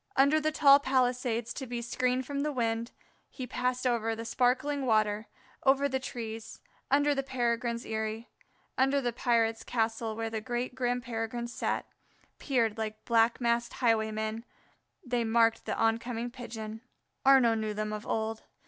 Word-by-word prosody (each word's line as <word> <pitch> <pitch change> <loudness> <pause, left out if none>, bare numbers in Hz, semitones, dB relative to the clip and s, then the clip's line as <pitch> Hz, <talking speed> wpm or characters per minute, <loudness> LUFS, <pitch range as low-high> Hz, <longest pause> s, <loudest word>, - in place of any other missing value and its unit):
Under 280 +3 +5
the 310 0 0
tall 280 -2 +7
Palisades, 250 -3 0
to 265 - -6
be 240 0 -3
screened 250 +2 0
from 280 +2 -3
the 300 +1 0
wind, 230 -2 -1 0.4
he 255 - -6
passed, 250 +1 -2
over 225 -2 +1
the 230 +1 -6
sparkling 260 +4 +1
water, 215 -1 +2 0.4
over 275 +1 +4
the 265 -1 -1
trees, 225 -3 -6 0.3
under 290 +1 +4
the 275 - 0
Peregrines' 240 -3 -1
eyrie, 220 +1 -3 0.5
under 270 +2 +3
the 245 -3 -1
pirates' 230 -2 +1
castle 225 -1 -1
where 225 0 -3
the 220 -1 -3
great 245 +2 -3
grim 245 -1 -1
Peregrines 235 0 -4
sat; - - -1 0.5
peering 235 -6 +1
like 215 -1 -5
black 230 0 +3
masked 235 -1 0
highwaymen 220 -1 0 0.6
they 245 -1 0
marked 230 0 +3
the - - -2
on 225 0 +2
coming 240 0 -4
Pigeon. 225 -3 -7 0.4
Arnaux 265 -4 +6
knew 215 -1 -2
them 215 0 -2
of 210 0 -6
old. 220 0 -2
235 Hz, 155 wpm, -30 LUFS, 225-255 Hz, 0.6 s, tall